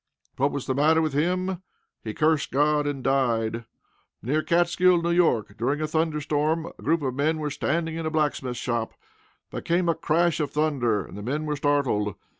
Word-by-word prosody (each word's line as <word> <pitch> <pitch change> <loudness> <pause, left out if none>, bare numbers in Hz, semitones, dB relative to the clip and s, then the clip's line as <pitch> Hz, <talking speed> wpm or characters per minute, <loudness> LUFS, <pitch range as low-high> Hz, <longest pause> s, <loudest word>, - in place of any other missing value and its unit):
What 140 +2 +2
was 140 -2 -4
the 130 - -1
matter 155 +4 +3
with 155 -3 0
him? 180 +4 0 0.4
He 110 -2 -5
cursed 155 -1 +2
God, 150 +1 +2
and 140 -3 -3
died! 115 -4 0 0.6
Near 145 +7 +1
Catskill, 175 +2 +3
N.Y., 170 -9 +3
during 130 +6 -1
a 155 - 0
thunder 160 0 0
storm, 155 +2 0
a - - -11
group 160 0 +1
of 130 -2 -1
men 150 +4 0
were 150 -1 -3
standing 165 +3 -1
in 165 -1 -3
a - - 0
blacksmith 145 -5 -1
shop. 120 -1 -2 0.6
There - - -5
came 175 +1 0
a 170 - +3
crash 165 +1 +1
of 150 -2 -1
thunder, 130 - 0
and - - -12
the 105 - -7
men 145 +8 -2
were 150 -1 -1
startled. 140 -8 0
150 Hz, 190 wpm, -25 LUFS, 130-160 Hz, 0.6 s, matter